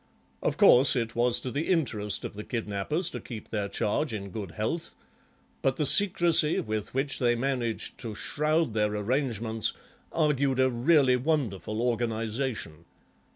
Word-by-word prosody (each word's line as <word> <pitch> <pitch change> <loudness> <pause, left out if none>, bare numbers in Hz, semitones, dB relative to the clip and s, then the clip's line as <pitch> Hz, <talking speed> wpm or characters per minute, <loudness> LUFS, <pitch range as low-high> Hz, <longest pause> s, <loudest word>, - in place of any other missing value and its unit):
Of - - -1
course 130 +3 +6
it 115 -2 -2
was 120 0 +2
to 130 - -5
the 145 +6 -2
interest 110 - 0
of - - -6
the 105 +1 -7
kidnappers 115 - -2
to - - -5
keep 110 -4 -9
their 105 -2 -2
charge 130 +8 -1
in 100 -2 -5
good 100 -3 -5
health, 110 - -3 0.7
but 135 -1 +1
the 150 - 0
secrecy 170 -3 +4
with 110 +1 -4
which 135 +1 0
they 120 -1 +2
managed 120 -2 -2
to 115 -3 -6
shroud 150 +2 0
their 105 -1 0
arrangements 115 -1 -1 0.4
argued 140 -4 +1
a 130 0 +3
really 130 +1 +3
wonderful 120 - -1
organisation. 115 - -2
120 Hz, 150 wpm, -28 LUFS, 110-140 Hz, 0.7 s, course